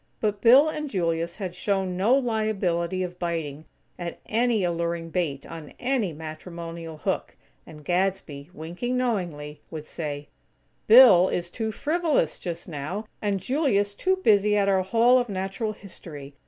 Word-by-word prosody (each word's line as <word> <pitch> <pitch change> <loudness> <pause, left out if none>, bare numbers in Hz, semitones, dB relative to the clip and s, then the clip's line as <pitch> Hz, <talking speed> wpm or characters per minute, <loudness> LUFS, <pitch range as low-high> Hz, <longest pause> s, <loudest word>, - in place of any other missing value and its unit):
But 210 -2 -1
Bill 260 +6 +7
and 300 -1 -3
Julius 170 -4 -1
had 190 -4 -4
shown 190 -1 -1
no 210 +8 +3
liability 200 -8 0
of 180 0 -6
biting 160 -4 -3 0.3
at 175 -1 -5
any 230 -2 +1
alluring 170 -1 -2
bait 150 -7 -2
on 160 -3 -9
any 245 -7 0
matrimonial 165 +1 -8
hook; - - -3 0.3
and 150 -2 -12
Gadsby, 175 -5 -1
winking 180 +10 -4
knowingly, 170 - -2
would 155 -2 -7
say: 145 -3 -5 0.6
"Bill 215 -6 +8
is 175 0 -2
too 220 +1 -3
frivolous, 305 - 0
just 170 -1 -6
now; 175 +7 -5 0.2
and 205 -2 0
Julius 205 - +1
too 375 - +1
busy 210 - +3
at 200 -1 +2
our 190 -1 +3
Hall 235 +6 +4
of 245 -2 -2
Natural 195 +3 -3
History. 155 -8 -10
185 Hz, 145 wpm, -25 LUFS, 165-220 Hz, 0.6 s, Bill